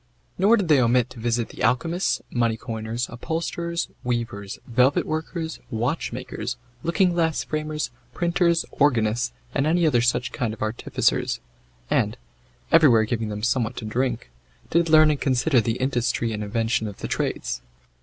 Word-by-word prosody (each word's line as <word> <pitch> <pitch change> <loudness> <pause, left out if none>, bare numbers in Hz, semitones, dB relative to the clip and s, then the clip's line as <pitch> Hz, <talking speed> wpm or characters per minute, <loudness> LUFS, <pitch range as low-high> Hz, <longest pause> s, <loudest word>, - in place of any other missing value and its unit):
Nor 210 +5 +5
did 200 -5 -1
they 150 -4 +5
omit 125 0 +2
to 120 - -10
visit 115 0 0
the - - -10
alchemists, 170 +8 +1
money 115 -2 +1
coiners, 115 0 -4
upholsterers, 170 +6 -3 0.2
weavers, 115 -5 -3
velvet 125 +3 +3
workers, 160 +1 -3
watchmakers, 125 0 -3 0.2
looking 180 - +2
glass 165 -2 +1
framers, 155 -2 -3 0.2
printers, 170 -1 +2
organists, 120 -4 +2 0.2
and 140 +1 +1
other 160 -7 +3
such 125 +2 +1
kind 110 -3 -2
of - - -5
artificers, 110 +2 0 0.5
and, - - +1 0.5
everywhere 140 -9 +6
giving 110 -1 -2
them 105 0 -5
somewhat 115 -1 0
to 110 - -5
drink, 120 - -2 0.4
did 170 0 +3
learn 155 -1 +7
and 145 - -2
consider 130 0 +3
the 115 +2 -1
industry 120 -3 0
and 105 0 -3
invention 110 +1 0
of 100 -1 -8
the - - -5
trades. - - -2
125 Hz, 145 wpm, -24 LUFS, 115-160 Hz, 0.5 s, learn